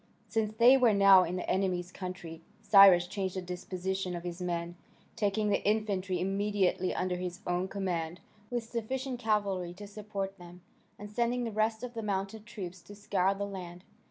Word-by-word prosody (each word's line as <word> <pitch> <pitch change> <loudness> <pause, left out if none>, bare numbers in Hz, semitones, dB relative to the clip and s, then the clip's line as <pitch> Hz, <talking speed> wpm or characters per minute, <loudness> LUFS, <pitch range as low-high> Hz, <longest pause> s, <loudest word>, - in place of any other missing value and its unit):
Since 220 -2 -1
they 245 +4 +7
were 240 -5 +4
now 195 -2 +7
in 175 +1 -3
the 180 - -4
enemy's 185 -2 0
country 180 -4 -7 0.2
Cyrus 195 -4 +8
changed 190 0 -3
the 185 - -2
disposition 185 +1 -4
of 170 - -6
his 175 0 -6
men, 170 -1 -3 0.4
taking 210 0 0
the - - +1
infantry 200 -3 0
immediately 195 -1 0
under 180 -1 -1
his 180 0 -5
own 180 +1 0
command, 180 -4 -3 0.3
with 240 -1 -2
sufficient 250 +3 -4
cavalry 200 -6 -1
to 205 +2 -9
support 200 -2 -5
them, 175 0 -12 0.4
and 205 0 -9
sending 240 +2 0
the 230 - -3
rest 220 +2 0
of 245 -1 -5
the 230 - -4
mounted 205 +1 -3
troops 185 -5 -7
to 205 - -13
scour 195 -1 +1
the 200 +1 -3
land. 180 -3 -8
195 Hz, 175 wpm, -31 LUFS, 180-210 Hz, 0.4 s, Cyrus